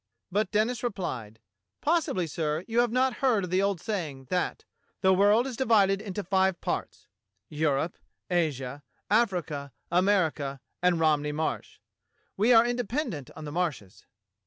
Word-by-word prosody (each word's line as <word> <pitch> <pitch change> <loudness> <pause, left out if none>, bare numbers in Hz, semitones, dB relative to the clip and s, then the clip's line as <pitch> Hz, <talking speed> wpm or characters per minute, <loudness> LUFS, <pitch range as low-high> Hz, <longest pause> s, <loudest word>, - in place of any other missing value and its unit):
But 205 +1 +1
Denis 220 +4 +1
replied: 130 - -4 0.4
"Possibly, 305 - +1
sir, 155 0 -2
you 230 +1 +1
have 240 -1 +3
not 255 +1 +1
heard 240 -7 +3
of 180 - -4
the 185 +1 +3
old 200 -2 0
saying, 155 -11 -4
that 180 -1 -1 0.4
*The 190 -1 +5
world 205 +5 +4
is 265 -3 -4
divided 205 -6 +3
into 205 -1 -4
five 190 -1 +2
parts - - -4 0.2
— 100 +1 -52 0.2
Europe, 150 +4 0 0.3
Asia, 145 -6 -1 0.3
Africa, 175 -11 +1 0.2
America, 170 -7 +1 0.2
and 180 -2 +3
Romney 150 -2 +2
Marsh.' 155 +1 -3 0.6
We 215 +5 +3
are 230 -1 +7
independent 240 - -2
on 155 - -8
the 145 - -6
Marshes." 150 - -3
185 Hz, 145 wpm, -28 LUFS, 150-220 Hz, 0.6 s, are